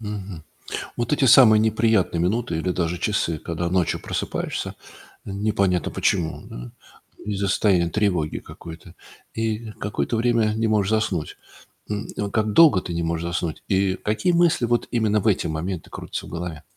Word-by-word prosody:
Мгм. 100 -5 -6 0.5
Вот 120 +3 -1
эти 145 - +2
самые 110 -3 +8
неприятные 110 -5 +2
минуты 100 +2 0
или 90 +3 -1
даже 85 -1 -1
часы, 85 -4 0
когда 85 +2 -3
ночью 90 -2 +1
просыпаешься, - - -3 0.5
непонятно 100 -3 0
почему, 85 -4 0
м. - - -9 0.5
Из-за 100 -1 -2
состояния 95 -3 +2
тревоги 90 -7 0
какой-то, 85 +1 -12 0.4
и 110 0 -2
какое-то 105 +3 -2
время 115 -2 +2
не 115 0 0
можешь 105 -3 +1
заснуть. 105 -8 -1 0.5
М, 105 0 -3
вот 100 -1 -2
как 110 -1 +1
долго 150 - +7
ты 85 - -6
не 85 - -2
можешь 85 +1 -2
заснуть? 85 -2 -3
И 95 -1 +1
какие 110 - 0
мысли 170 -7 +3
вот 120 0 0
именно 110 -3 +2
в 110 - -2
эти 100 -5 +2
моменты 80 +3 -4
крутятся - - -6
в - - -11
голове? 85 -2 -6
100 Hz, 155 wpm, -23 LUFS, 85-110 Hz, 0.5 s, самые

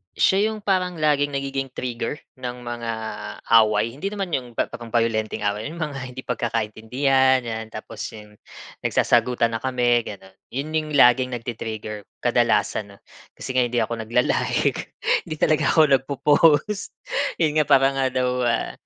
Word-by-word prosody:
Siya 200 +3 +3
'yong 215 -1 -5
parang 185 -3 0
laging 150 -2 +2
nagiging 135 0 -2
trigger, 125 +3 -3 0.2
ng 125 -1 -6
mga 120 -1 -4 0.7
away. 110 +1 0
Hindi 145 +11 -5
naman 195 -4 -4
'yong 125 -4 -3
pep - - -1
pang 120 0 -8
bayolenteng 110 -2 0
away, 105 +3 -1
'yong 160 - -8
mga 150 -5 -4 0.2
hindi 130 - -7
pagkakaintindihan, 125 +3 +1
'yan. 110 -1 -5
Tapos 110 -1 -9 0.2
'yong, 105 -1 -14 0.4
nagsasagutan 120 -2 +2
na 115 - -2
kami, 120 -2 +1
gano'n, 95 -1 -9 0.2
'yon 145 +3 -3
'yong 155 -2 -1
laging 125 -1 +5
nagti-trigger 110 -3 -6 0.2
kadalasan, 100 -2 +1
'no. - - -21 0.4
Kasi - - -6
nga 125 - +4
hindi 120 0 -1
ako 115 0 -4
nagla-like, 125 +2 0 0.3
hindi 155 - -4
talaga 155 0 +2
ako 160 - +7
nag-po-post, 150 +7 +2 0.4
'yon 155 -2 +2
nga - - +5
para 135 -1 +5
nga 135 -1 +1
daw 130 -1 0 0.2
ah, 115 - 0
125 Hz, 155 wpm, -23 LUFS, 115-145 Hz, 0.7 s, ako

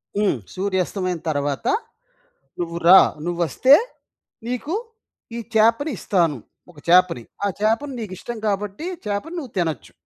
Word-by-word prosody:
హ్మ్. 205 -8 +2 0.2
"సూర్యాస్తమయం 185 -2 -1
తరువాత 145 -2 -2 0.9
నువ్వు 170 -1 -3
రా, 190 +2 +10 0.3
నువ్వొస్తే 175 - +3 0.7
నీకు 250 +6 -3 0.6
ఈ - - -3 0.2
చేపని 230 +7 +3
ఇస్తాను. 170 -7 +1 0.3
ఒక 150 - -16
చేపని. 175 -8 +4 0.2
ఆ - - +3
చేపని 230 +7 +1
నీకు 210 -5 -6
ఇష్టం 240 - -6
కాబట్టి 205 - -2 0.2
చేపను 210 +13 -3
నువ్వు 260 -8 -9
తినొచ్చు." 160 -7 -2
195 Hz, 120 wpm, -22 LUFS, 175-230 Hz, 0.9 s, రా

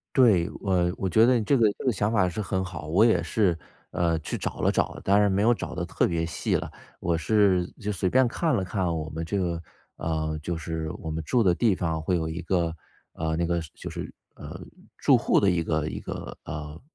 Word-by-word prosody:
对， 105 -10 +5
我 90 -3 +1
我 95 - -1
觉 110 +5 +5
得 125 0 +4
这 125 +6 +2
个 110 -3 +4
这 - - -7
个 130 - +3
想 105 +1 0
法 100 -5 +3
是 100 +5 -3
很 95 -1 -1
好。 90 -5 -7
我 95 +8 +4
也 110 -7 +4
是， 90 +1 +1 0.4
呃， 85 -2 +1
去 80 - -4
找 - - -4
了 - - +3
找 - - +1
了， - - -9
当 100 +1 +4
然 105 -1 +3
没 95 +1 +1
有 115 +3 +4
找 - - -6
得 90 - -3
特 - - +1
别 80 -1 -1
细 85 - -1
了。 - - -4 0.3
我 85 -1 0
是 95 +2 +3 0.2
就 105 +1 -2
随 95 -1 -1
便 130 0 +4
看 155 +6 0
了 95 -5 0
看 95 +1 -2
我 80 -1 -4
们 80 +1 -4
这 100 +5 -2
个 85 -3 -1 0.3
呃， 80 -1 -2
就 85 +2 -2
是 80 0 -4
我 80 - -6
们 80 +1 -3
住 115 +9 +2
的 90 -2 +4
地 105 0 +2
方 80 -3 -2
会 90 +3 +1
有 80 -2 -1
一 80 +2 -4
个， 85 -2 0 0.4
呃， 80 0 -2
那 85 +1 0
个 85 0 0
是 80 - -11
就 - - -7
是， - - -6 0.2
呃， - - -9 0.4
住 - - +5
户 - - +2
的 100 - +3
一 90 -3 +2
个 80 -1 -1
一 - - -5
个， - - -7
呃 75 +1 -7
90 Hz, 260 characters per minute, -26 LUFS, 80-105 Hz, 0.4 s, 对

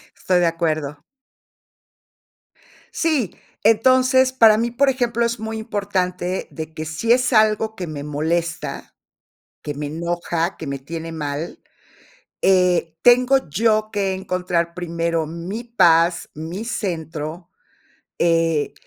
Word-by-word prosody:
Estoy 180 -1 +1
de 175 - +3
acuerdo. 155 -3 -2 1.9
Sí, 305 - 0 0.3
entonces, 255 +4 +4
para 225 -4 +6
mí, 235 +2 0
por 270 +3 +3
ejemplo, 240 -2 0
es 235 -1 -2
muy 220 0 -4
importante 190 -4 -2
de 160 -1 -7
que 155 0 -5
si 160 +9 -1
es 255 +1 +3
algo 215 0 +3
que 180 -5 -5
me 145 -2 -6
molesta, 160 +3 -3 0.7
que 145 - -4
me 145 0 -5
enoja, 170 +2 -2
que 155 - -7
me 140 -1 -4
tiene 165 +4 -6
mal, 150 0 -5 0.8
eh, 180 -4 +3
tengo 250 - +4
yo 215 +5 +1
que 195 -2 0
encontrar 180 -2 -2
primero 170 -2 -2
mi 175 +8 -6
paz, 170 -7 +3
mi 165 +7 -6
centro, 170 -5 -4 0.7
eh, 165 -3 +2
180 Hz, 120 wpm, -21 LUFS, 165-220 Hz, 1.9 s, para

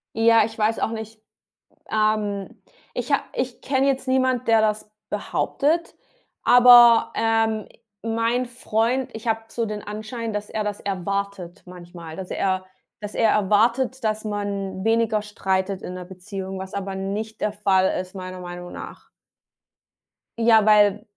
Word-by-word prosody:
Ja, 225 0 +5
ich 225 0 -9
weiß 220 +1 +1
auch - - 0
nicht, 220 -1 -7 0.7
ähm, 215 -2 -1 0.3
ich - - -4
ha - - +3
ich 255 -1 -3
kenne 270 0 +1
jetzt 270 -1 0
niemand, 260 -2 +1
der 225 -1 +5
das 215 0 -1 0.2
behauptet, 325 +4 -1 0.5
aber, 240 -1 +8
ähm, 225 -1 +1
i - - -23 0.3
mein 230 +2 0
Freund, 240 +2 -1
ich 220 +1 -7
habe 225 0 0
so 230 0 -3
den 210 -1 -5
Anschein, 220 +2 -5
dass 210 0 -4
er 215 - -2
das 205 -1 -3
erwartet 200 -1 -4
manchmal 175 -2 -10
dass 190 0 -7
er 185 -1 -1 0.4
dass 210 0 -7
er 225 -2 +3
erwartet, 230 +6 +2
dass 215 0 -1
man 200 -2 -3
weniger 225 -1 +2
streitet 190 -2 -2
in 180 - -7
der 180 -1 -7
Beziehung, 190 +1 -7
was 190 0 -8
aber 195 -1 -4
nicht 205 +3 -4
der 210 - 0
Fall 190 -3 +2
ist, 185 0 -7
meiner 185 -1 -7
Meinung 175 0 -8
nach. - - -10 1.3
Ja, 225 -2 +5
weil 210 -1 +5
215 Hz, 150 wpm, -23 LUFS, 195-230 Hz, 1.3 s, aber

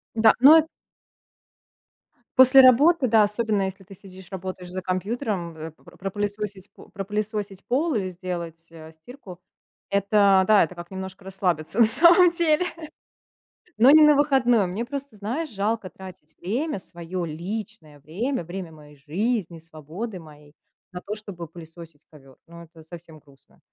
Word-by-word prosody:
Да. 220 -1 +5
Ну 295 +5 +8
э 320 - +4 1.7
После 260 +1 +8
работы, 265 +4 +5
да, 220 -2 +4
особенно 210 0 -1
если 190 0 -6
ты 195 +1 -14
сидишь 190 -1 -15
работаешь 185 -1 -7
за 185 - -5
компьютером, 185 - -3
э, 160 0 -8
про 175 +2 -20
пропылесосить, 205 0 -5
п - - -15
пропылесосить 205 -1 -5
пол 295 +6 0
или 200 -6 -1
сделать, 170 -2 -7
э, 160 -1 -13
стирку 180 - -14 0.5
это, 200 -1 +3
да, 215 -2 +5
это 170 - -5
как 175 -1 -11
немножко 190 0 -8
расслабиться 185 -2 -3
на 230 - +7
самом 340 - +5
деле, 335 0 +1 1.1
но 250 +5 +6
не 310 - +7
на 300 -1 +6
выходном. 245 -9 +2
Мне 225 +6 -4
просто, 280 -2 -7
знаешь, 250 +11 -4
жалко 210 -1 -3
тратить 180 -5 -13
время, 235 - -3
своё 175 0 -6
личное 170 -1 -7
время, 200 - -4
время 175 0 -8
моей 150 -2 -16
жизни, 175 - -3
свободы 165 +7 -8
моей 150 -2 -16 0.4
на 180 - -8
то, 205 - -6
чтобы 200 -6 -9
пылесосить 165 -1 -14
ковёр. 135 -4 -18
Ну 170 0 -13
это 165 0 -17
совсем 165 -1 -13
грустно. 140 -2 -25
195 Hz, 150 wpm, -23 LUFS, 170-225 Hz, 1.7 s, Ну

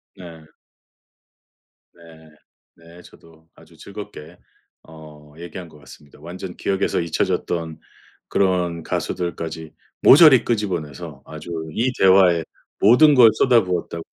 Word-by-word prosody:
네. 85 -4 -13 1.5
네. 80 -2 -18 0.5
네. 85 +1 -17
저도 80 -1 -20
아주 - - -21
즐겁게 75 - -11 0.5
어 75 -2 -16
얘기한 85 0 -10
것 75 - -18
같습니다. 70 +1 -17
완전 90 +2 -9
기억에서 95 0 -2
잊혀졌던 85 0 -3 0.5
그런 90 -4 -1
가수들까지 80 -2 -5 0.3
모조리 145 -4 +7
끄집어내서 85 - -4
아주 80 +2 -11 0.2
이 120 +9 -1
대화에 95 -3 +4 0.4
모든 135 +8 +5
걸 120 -3 +7
쏟아부었다고 90 -9 0
85 Hz, 250 characters per minute, -20 LUFS, 80-95 Hz, 1.5 s, 모조리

